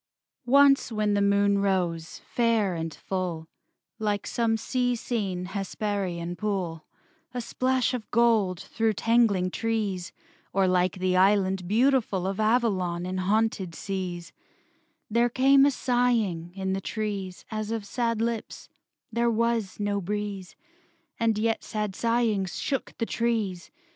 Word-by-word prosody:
III -, -, -4 dB
Once 280 Hz, -2 st, +5 dB
when 215 Hz, -1 st, +1 dB
the 205 Hz, -, +2 dB
moon 200 Hz, 0 st, +3 dB
rose, 175 Hz, -4 st, -1 dB
fair 230 Hz, -5 st, +1 dB
and 165 Hz, -1 st, -3 dB
full, 175 Hz, -1 st, -4 dB, 0.5 s
Like 205 Hz, -2 st, -1 dB
some 225 Hz, -1 st, +1 dB
sea 245 Hz, +2 st, 0 dB
seen 200 Hz, -7 st, -2 dB
Hesperian 195 Hz, -3 st, -3 dB
pool, 185 Hz, -6 st, -3 dB, 0.5 s
A -, -, -1 dB
splash 255 Hz, +1 st, 0 dB
of 240 Hz, -4 st, -5 dB
gold 220 Hz, -6 st, +3 dB
through 225 Hz, -1 st, -1 dB
tangling 210 Hz, -4 st, +2 dB
trees, 205 Hz, -5 st, -2 dB, 0.4 s
Or 195 Hz, -1 st, +3 dB
like 185 Hz, +1 st, +2 dB
the 185 Hz, 0 st, +1 dB
Island 190 Hz, -1 st, +3 dB
beautiful 225 Hz, -3 st, +2 dB
Of 195 Hz, +2 st, -2 dB
Avalon 200 Hz, -6 st, +1 dB
in 185 Hz, +1 st, -3 dB
haunted 195 Hz, -2 st, 0 dB
seas, 180 Hz, -3 st, -5 dB, 0.7 s
There 235 Hz, +2 st, +2 dB
came 270 Hz, +3 st, +5 dB
a -, -, +3 dB
sighing 235 Hz, -10 st, 0 dB
in 190 Hz, -1 st, -2 dB
the 195 Hz, -, -2 dB
trees 200 Hz, -4 st, -4 dB
As 215 Hz, -1 st, -3 dB
of 225 Hz, -2 st, -3 dB
sad 230 Hz, +1 st, -1 dB
lips; 230 Hz, -1 st, -4 dB, 0.4 s
there 235 Hz, +1 st, +1 dB
was 230 Hz, -3 st, 0 dB
no 205 Hz, -1 st, 0 dB
breeze, 200 Hz, -1 st, -4 dB, 0.6 s
And 225 Hz, -2 st, +2 dB
yet 225 Hz, +1 st, 0 dB
sad 210 Hz, -3 st, -3 dB
sighings 230 Hz, -5 st, 0 dB
shook 270 Hz, -2 st, -3 dB
the 230 Hz, -, -1 dB
trees. 220 Hz, -7 st, -1 dB
205 Hz, 135 wpm, -27 LUFS, 185-230 Hz, 0.7 s, Once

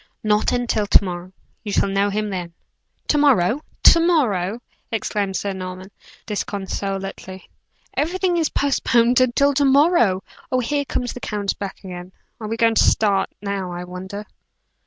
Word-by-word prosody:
"Not 210 Hz, 0 st, +2 dB
until 235 Hz, -4 st, 0 dB
to -, -, +5 dB
morrow 180 Hz, -1 st, -6 dB, 0.3 s
you 210 Hz, -, -4 dB
shall 200 Hz, -, +2 dB
know 195 Hz, +1 st, +1 dB
him 210 Hz, +1 st, -2 dB
then." 175 Hz, -3 st, -5 dB, 0.6 s
"To 295 Hz, -, +3 dB
morrow! 265 Hz, -3 st, +3 dB, 0.2 s
to 335 Hz, -, +8 dB
morrow!" 240 Hz, -, +1 dB, 0.3 s
exclaimed 205 Hz, -3 st, -2 dB
Sir 200 Hz, 0 st, -2 dB
Norman, 185 Hz, +1 st, -7 dB, 0.3 s
disconsolately. 195 Hz, -2 st, -4 dB, 0.5 s
"Everything 360 Hz, +3 st, 0 dB
is 320 Hz, -3 st, +1 dB
postponed 245 Hz, -3 st, +2 dB
until 265 Hz, +3 st, +3 dB
to 285 Hz, +1 st, +2 dB
morrow! 270 Hz, -, +4 dB, 0.3 s
Oh, 255 Hz, -, +2 dB
here 285 Hz, +4 st, -1 dB
comes 245 Hz, -2 st, -3 dB
the -, -, -8 dB
count 205 Hz, -4 st, -3 dB
back 200 Hz, 0 st, -6 dB
again. 180 Hz, 0 st, -8 dB, 0.3 s
Are 215 Hz, -, -5 dB
we 225 Hz, +1 st, -3 dB
going 230 Hz, 0 st, +3 dB
to -, -, +4 dB
start 200 Hz, -3 st, +2 dB
now, 200 Hz, -3 st, -3 dB
I 175 Hz, 0 st, -5 dB
wonder?" 190 Hz, +3 st, -7 dB
205 Hz, 155 wpm, -21 LUFS, 190-250 Hz, 0.6 s, to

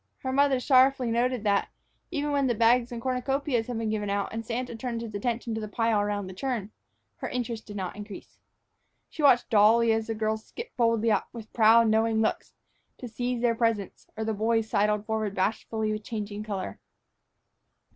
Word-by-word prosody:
Her 260 Hz, -, -1 dB
mother 275 Hz, -1 st, +3 dB
sorrowfully 260 Hz, -1 st, +4 dB
noted 245 Hz, 0 st, 0 dB
that, 200 Hz, -2 st, +1 dB, 0.4 s
even 295 Hz, -3 st, -2 dB
when 280 Hz, -2 st, +2 dB
the 240 Hz, -, +1 dB
bags 235 Hz, +2 st, +3 dB
and 240 Hz, -, -5 dB
cornucopias 255 Hz, 0 st, -1 dB
had 245 Hz, -2 st, -3 dB
been 225 Hz, -1 st, -1 dB
given 210 Hz, -2 st, -2 dB
out 200 Hz, +1 st, -2 dB
and 225 Hz, 0 st, -4 dB
Santa 240 Hz, +1 st, -4 dB
turned 235 Hz, 0 st, -4 dB
his 225 Hz, -2 st, -7 dB
attention 230 Hz, +2 st, -2 dB
to 220 Hz, -, -3 dB
the 215 Hz, -, -4 dB
pile 225 Hz, 0 st, +1 dB
around 205 Hz, -1 st, -2 dB
the 185 Hz, -, -8 dB
churn, 220 Hz, -1 st, -3 dB, 0.5 s
her -, -, -5 dB
interest 235 Hz, -3 st, -4 dB
did 205 Hz, -, -8 dB
not 185 Hz, -3 st, -4 dB
increase. 205 Hz, -1 st, -10 dB, 0.7 s
She -, -, -6 dB
watched 260 Hz, -4 st, +4 dB
dully 225 Hz, +2 st, +5 dB
as 220 Hz, 0 st, -1 dB
the 225 Hz, -, -2 dB
girls 220 Hz, 0 st, -1 dB
skipped 465 Hz, -, -9 dB
boldly 230 Hz, -1 st, +2 dB
up, -, -, +1 dB
with 225 Hz, -2 st, -10 dB
proud, 230 Hz, 0 st, +6 dB
knowing 220 Hz, 0 st, +2 dB
looks, 220 Hz, -, -1 dB, 0.4 s
to 250 Hz, -, -7 dB
seize 245 Hz, +1 st, -3 dB
their 235 Hz, -1 st, +3 dB
presents, 225 Hz, -4 st, -1 dB
or 220 Hz, -, -2 dB
the 220 Hz, -, -1 dB
boys 225 Hz, +1 st, +1 dB
sidled 210 Hz, 0 st, +1 dB
forward 215 Hz, -2 st, -2 dB
bashfully 215 Hz, +2 st, -1 dB
with 215 Hz, 0 st, -4 dB
changing 210 Hz, -2 st, -5 dB
color. 195 Hz, -, -5 dB
225 Hz, 190 wpm, -27 LUFS, 215-245 Hz, 0.7 s, proud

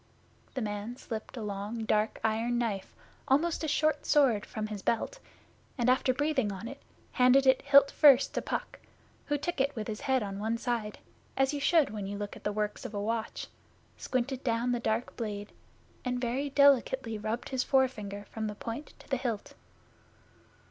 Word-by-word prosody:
The 260 Hz, -, -1 dB
man 210 Hz, +3 st, -4 dB
slipped 225 Hz, +1 st, -6 dB
a 225 Hz, -, -4 dB
long 210 Hz, +2 st, -4 dB
dark 215 Hz, 0 st, +1 dB
iron 225 Hz, +2 st, +1 dB
knife, 215 Hz, -5 st, -2 dB, 0.3 s
almost 320 Hz, +5 st, +2 dB
a -, -, 0 dB
short 305 Hz, 0 st, +1 dB
sword, 260 Hz, -9 st, +3 dB
from 215 Hz, -1 st, -4 dB
his 210 Hz, -2 st, -5 dB
belt, 365 Hz, -, -1 dB, 0.6 s
and 245 Hz, 0 st, +3 dB
after 255 Hz, 0 st, +3 dB
breathing 265 Hz, -5 st, 0 dB
on 195 Hz, +4 st, -6 dB
it, 275 Hz, +3 st, -9 dB, 0.3 s
handed 255 Hz, +1 st, +5 dB
it 260 Hz, 0 st, +5 dB
hilt 280 Hz, 0 st, +6 dB
first 280 Hz, -3 st, +6 dB
to -, -, -1 dB
Puck, -, -, -4 dB, 0.5 s
who 290 Hz, -, +1 dB
took 300 Hz, 0 st, -2 dB
it 280 Hz, +1 st, 0 dB
with 220 Hz, -2 st, -4 dB
his 215 Hz, -1 st, -5 dB
head 265 Hz, -4 st, +1 dB
on 195 Hz, -1 st, -5 dB
one 220 Hz, +2 st, -1 dB
side, 230 Hz, -3 st, -2 dB, 0.4 s
as 270 Hz, +1 st, +2 dB
you 290 Hz, -, -2 dB
should 310 Hz, -, +3 dB
when 205 Hz, -2 st, -4 dB
you 200 Hz, +1 st, -4 dB
look 205 Hz, 0 st, -5 dB
at -, -, -13 dB
the 210 Hz, -, 0 dB
works 210 Hz, 0 st, -2 dB
of 215 Hz, -, -6 dB
a -, -, -1 dB
watch, 225 Hz, +2 st, -2 dB, 0.5 s
squinted 255 Hz, +1 st, -2 dB
down 235 Hz, 0 st, +1 dB
the 240 Hz, -, 0 dB
dark 225 Hz, +1 st, -1 dB
blade, 205 Hz, -3 st, -5 dB, 0.5 s
and 250 Hz, -1 st, -1 dB
very 255 Hz, +4 st, -1 dB
delicately 265 Hz, -5 st, +3 dB
rubbed 220 Hz, +3 st, -3 dB
his 260 Hz, -1 st, 0 dB
forefinger 210 Hz, -7 st, 0 dB
from 220 Hz, -1 st, -3 dB
the 210 Hz, -, -5 dB
point 230 Hz, +7 st, -6 dB
to -, -, -17 dB
the 270 Hz, -, 0 dB
hilt. 235 Hz, -5 st, -3 dB
240 Hz, 185 wpm, -30 LUFS, 215-270 Hz, 0.6 s, hilt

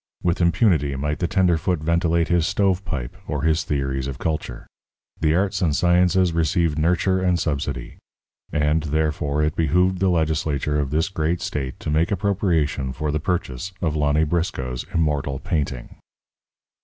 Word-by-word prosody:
With 85 Hz, +1 st, +1 dB
impunity 85 Hz, -, +2 dB
might 75 Hz, +3 st, -2 dB
the 85 Hz, -, 0 dB
tenderfoot 90 Hz, -1 st, +2 dB
ventilate 85 Hz, +1 st, +1 dB
his 85 Hz, -2 st, +2 dB
"stovepipe" 95 Hz, -, -1 dB
or -, -, -2 dB
his 80 Hz, 0 st, +2 dB
theories 65 Hz, -2 st, -2 dB
of 70 Hz, -1 st, -5 dB
culture. 75 Hz, -5 st, -3 dB, 0.5 s
The 80 Hz, 0 st, +2 dB
arts 95 Hz, +2 st, 0 dB
and 80 Hz, -5 st, +2 dB
sciences 90 Hz, +1 st, +3 dB
received 80 Hz, -1 st, +1 dB
nurture 90 Hz, +3 st, +2 dB
and 90 Hz, -2 st, +2 dB
subsidy. 70 Hz, -5 st, -3 dB, 0.5 s
And, 75 Hz, +1 st, +1 dB
therefore, 75 Hz, -1 st, 0 dB
it 75 Hz, 0 st, 0 dB
behooved 90 Hz, +4 st, +2 dB
the 95 Hz, 0 st, +2 dB
legislature 75 Hz, -3 st, 0 dB
of 70 Hz, -2 st, -1 dB
this 80 Hz, +3 st, +1 dB
great 85 Hz, -2 st, -1 dB
state 65 Hz, -3 st, -4 dB
to -, -, -3 dB
make 80 Hz, +3 st, +2 dB
appropriation 85 Hz, -9 st, 0 dB
for 75 Hz, +2 st, -2 dB
the 75 Hz, -, -1 dB
purchase 85 Hz, 0 st, -3 dB
of 80 Hz, -3 st, -1 dB
Lonny 75 Hz, +1 st, +2 dB
Briscoe's 75 Hz, -7 st, -2 dB
immortal 75 Hz, -5 st, 0 dB
painting. 70 Hz, -4 st, -3 dB
80 Hz, 150 wpm, -22 LUFS, 75-90 Hz, 0.5 s, sciences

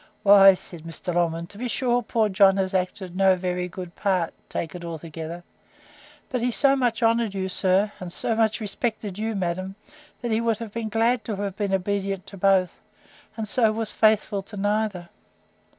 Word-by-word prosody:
—Why, 195 Hz, -1 st, +8 dB
said 175 Hz, -2 st, -10 dB
Mr. 165 Hz, +2 st, -5 dB
Longman, 170 Hz, -1 st, 0 dB
to 200 Hz, +4 st, -14 dB
be 250 Hz, -, -2 dB
sure 245 Hz, 0 st, +1 dB
poor 225 Hz, -1 st, +1 dB
John 195 Hz, -1 st, +4 dB
has 190 Hz, 0 st, -1 dB
acted 185 Hz, -1 st, -2 dB
no 190 Hz, 0 st, +4 dB
very 180 Hz, 0 st, -2 dB
good 180 Hz, -1 st, -8 dB
part, 185 Hz, -5 st, 0 dB, 0.2 s
take 165 Hz, -, -4 dB
it 175 Hz, -1 st, -8 dB
altogether; 165 Hz, +1 st, -7 dB, 0.8 s
but 250 Hz, -2 st, -2 dB
he 245 Hz, -, +1 dB
so 275 Hz, +3 st, +3 dB
much 245 Hz, -3 st, 0 dB
honoured 225 Hz, -2 st, +2 dB
you, 190 Hz, -1 st, -1 dB
sir, 190 Hz, +2 st, +1 dB
and 180 Hz, -1 st, -7 dB
so 230 Hz, -, -1 dB
much 220 Hz, 0 st, +1 dB
respected 210 Hz, -2 st, -3 dB
you, 220 Hz, 0 st, -2 dB
madam, 185 Hz, +1 st, -3 dB, 0.5 s
that 240 Hz, -, -2 dB
he 220 Hz, +1 st, +2 dB
would 230 Hz, -2 st, +1 dB
have 225 Hz, -2 st, -7 dB
been 230 Hz, -1 st, -3 dB
glad 230 Hz, +3 st, +1 dB
to 215 Hz, -, -3 dB
have 200 Hz, -1 st, -4 dB
been 205 Hz, -2 st, -2 dB
obedient 195 Hz, 0 st, -1 dB
to -, -, -11 dB
both; 190 Hz, -1 st, +2 dB, 0.6 s
and 220 Hz, -1 st, -3 dB
so 225 Hz, +1 st, +3 dB
was 220 Hz, 0 st, -2 dB
faithful 215 Hz, -2 st, +2 dB
to 205 Hz, +2 st, -11 dB
neither. 205 Hz, -3 st, -1 dB
195 Hz, 185 wpm, -24 LUFS, 185-220 Hz, 0.8 s, Why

